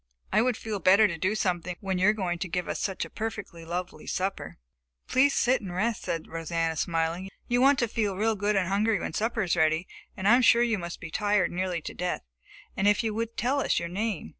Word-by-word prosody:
I 215 - +5
would 250 -1 +1
feel 215 -2 -4
better 200 +4 +6
to 170 - -4
do 185 +6 0
something 180 -3 -1
when 190 -2 -2
you 185 - +4
are 210 - +6
going 180 -5 -2
to 185 - -3
give 180 +1 -2
us - - -3
such 190 -2 -2
a - - -11
perfectly 205 -6 -5
lovely 175 +2 -5
supper." 190 +1 -3 0.5
"Please 275 +2 +3
sit 255 +2 +3
still 205 - -9
and 175 - -6
rest," 220 +4 0
said 165 -1 -3
Rosanna, 165 0 -2
smiling. 165 +3 -1 0.2
"You 245 +1 +2
want 275 +1 +5
to 240 - +1
feel 210 -3 -1
real 220 +2 +1
good 205 +1 0
and 190 -2 +1
hungry 210 +3 +1
when - - -4
supper 225 0 0
is 180 - +1
ready, 160 +1 +2 0.3
and 190 0 -1
I 220 - +7
am 255 - +4
sure 235 0 +6
you 225 -4 +1
must 170 -1 -6
be 170 -3 -7
tired 205 0 +1
nearly 180 -1 -2
to - - -6
death. 180 0 -3 0.5
And 195 - +1
if 210 +3 +3
you 220 -1 -1
would 230 +1 -3
tell 265 +4 +1
us - - +1
your 170 - -2
name.... 200 - -3
195 Hz, 240 wpm, -27 LUFS, 175-220 Hz, 0.5 s, I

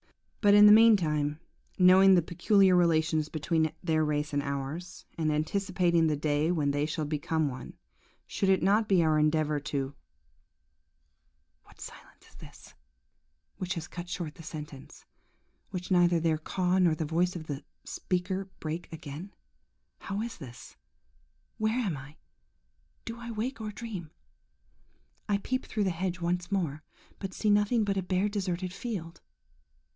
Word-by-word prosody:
"But, 205 -2 +6
in 205 0 +9
the 210 - +9
meantime, 160 -10 +4 0.4
knowing 190 +1 +7
the 175 - +3
peculiar 185 +3 +3
relations 160 -3 +2
between 160 0 0
their 160 -2 +2
race 150 0 -1
and 145 - +1
ours, 140 +5 -5
and 155 -2 0
anticipating 170 +1 +1
the 150 -2 0
day 150 +2 +1
when 150 -5 +1
they 145 +1 0
shall 155 0 -3
become 155 +1 -1
one, 130 -2 -7 0.5
should 195 - -1
it 190 - +3
not 210 +3 +3
be 185 -4 +4
our 155 -1 +3
endeavour 150 -1 +1
to... 140 -1 -3 0.8
"... - - -46
–What - - -21
silence - - -12
is - - -21
this, - - -14 0.8
which 185 +1 -3
has 165 -1 -5
cut 175 0 -8
short 170 -4 -4
the 165 - -13
sentence, 150 -4 -9
and 70 +3 -41
which 180 0 -5
neither 175 -2 +4
their 160 -1 +1
caws 185 +3 0
nor 170 -3 +4
the 155 - -3
voice 175 +4 0
of 160 -3 -6
the 145 -3 -5 0.2
speaker 185 +2 -2
break 160 +2 -5
again? 160 +4 -8 0.7
How 200 +2 -4
is 235 -3 -7
this?–where 140 - -8
am 205 -10 -1
I?–Do 150 - -14
I 235 0 -7
wake 230 +2 -4
or 215 - -4
dream? 205 -7 -7 1.2
I 205 - +3
peep 255 +6 -3
through 210 - -1
the 190 - +1
hedge 180 +1 -3
once 175 +1 -2
more, 160 -7 -1 0.4
but 190 -2 -6
see 215 - +1
nothing 210 +3 +3
but 200 -1 -1
a - - +1
bare, 185 +2 0
deserted 185 -3 -3
field. 185 -7 -6
175 Hz, 155 wpm, -29 LUFS, 155-195 Hz, 1.2 s, in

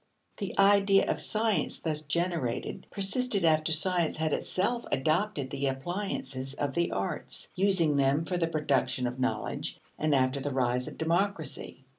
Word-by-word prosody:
The 200 -3 -5
idea 195 0 +5
of - - -1
science 215 -7 +1
thus 155 -2 -1
generated 160 -4 -2
persisted 200 0 +1
after 155 0 +3
science 170 +1 +1
had 155 -1 0
itself 235 +6 0
adopted 155 0 0
the 140 0 -1
appliances 135 -3 -3
of 145 -1 -2
the 170 +3 +1
arts, 95 - -3
using 180 -6 +3
them 140 +3 +2
for 180 +1 -2
the 165 -1 +1
production 145 -5 0
of 125 +1 -3
knowledge, 130 0 -2 0.2
and 155 -2 +2
after 130 +1 +2
the 140 +2 -3
rise 125 -2 0
of - - -8
democracy. 165 -6 -1
160 Hz, 150 wpm, -29 LUFS, 135-190 Hz, 0.2 s, idea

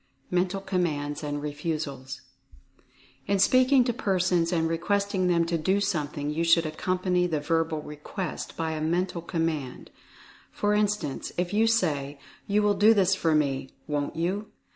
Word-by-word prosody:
MENTAL 180 +2 0
COMMANDS 160 -7 -2
AND 145 0 -3
REFUSALS. 145 -3 -4 1.1
In 200 0 +2
speaking 255 +6 +5
to 240 -1 -1
persons 185 -6 +1
and 165 -2 +1
requesting 190 +3 0
them 170 -1 +3
to 170 0 -1
do 190 +5 +2
something, 150 -7 -2
you 160 +2 -1
should 165 0 +4
accompany 180 +3 0
the 160 -3 -1
verbal 160 0 -1
request 150 +4 -6
by 160 -1 -1
a 155 -1 -3
Mental 175 +2 -1
Command. 160 -5 -3 0.6
For 205 0 0
instance, 210 -9 -1
if 180 +2 -1
you 220 +2 +3
say 150 -11 0 0.3
"You 210 +1 +2
will 205 0 +3
do 210 +3 +5
this 195 -2 +3
for 165 -4 +1
me, 135 -3 0 0.2
won't 145 0 -2
you?" 185 +6 -2
170 Hz, 150 wpm, -27 LUFS, 150-195 Hz, 1.1 s, speaking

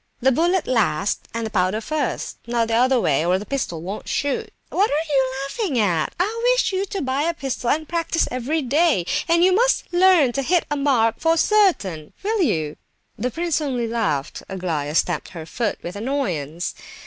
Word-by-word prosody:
The 265 +2 +3
bullet 345 +6 +2
last 200 -6 0
and 230 0 -3
the 220 - -5
powder 185 +1 +1
first, 290 +2 -3
not 235 -1 0
the - - 0
other 250 +2 +4
way, 155 -7 +2
or 180 +2 +2
the 205 - -7
pistol 195 - -3
won't 195 +4 -6
shoot. 355 +11 -1 0.2
What 405 +3 +2
are 300 0 -1
you 265 -1 +2
laughing 290 - -2
at? 175 -8 +1
I 435 +6 0
wish - - +2
you 380 +1 0
to 390 -4 -3
buy 265 +1 0
a 335 +2 0
pistol 265 -5 -3
and 310 +1 0
practise 335 -1 0
every 270 +6 -1
day, 285 - +2 0.2
and 335 +1 +4
you 370 +1 +5
must 480 -2 +1
learn 350 -7 +5
to 275 - -1
hit 345 +6 +1
a - - +1
mark 250 -6 +2
for 325 0 +2
certain; 315 - +2
will 430 +1 0
you?" 155 - 0 0.4
The 245 +4 -2
prince 330 +2 -1
only 250 -5 -1
laughed. 205 -12 -2
Aglaya 165 -6 -3
stamped 175 -1 0
her 160 - -6
foot 225 +6 -2
with 175 - -6
annoyance. 185 - -2
260 Hz, 190 wpm, -22 LUFS, 200-330 Hz, 0.4 s, you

